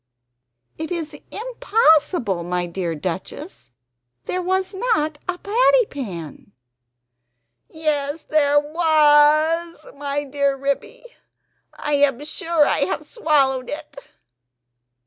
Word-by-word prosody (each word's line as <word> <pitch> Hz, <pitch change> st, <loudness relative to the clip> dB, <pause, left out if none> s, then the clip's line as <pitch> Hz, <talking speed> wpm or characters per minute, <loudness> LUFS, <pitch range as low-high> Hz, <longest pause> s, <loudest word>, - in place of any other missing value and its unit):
"It 320 Hz, -, -4 dB
is 325 Hz, -3 st, -4 dB
impossible, 345 Hz, -, +1 dB
my 180 Hz, +1 st, -2 dB
dear 170 Hz, -1 st, -3 dB
Duchess; 185 Hz, -, -6 dB, 0.6 s
there 365 Hz, -, -2 dB
was 375 Hz, +2 st, -1 dB
not 315 Hz, -9 st, 0 dB
a 360 Hz, -, -1 dB
patty 485 Hz, +5 st, +3 dB
pan." 180 Hz, -, -7 dB, 1.2 s
"Yes 305 Hz, -1 st, -2 dB
there 290 Hz, -1 st, +3 dB
WAS, 310 Hz, +1 st, +3 dB
my 285 Hz, 0 st, -3 dB
dear 280 Hz, 0 st, 0 dB
Ribby, 280 Hz, -, -3 dB, 0.7 s
I 295 Hz, -, -3 dB
am 285 Hz, -1 st, +1 dB
sure 320 Hz, 0 st, +1 dB
I -, -, +1 dB
have -, -, -4 dB
swallowed 275 Hz, -, +1 dB
it!" 295 Hz, -1 st, -7 dB
295 Hz, 100 wpm, -21 LUFS, 275-340 Hz, 1.2 s, patty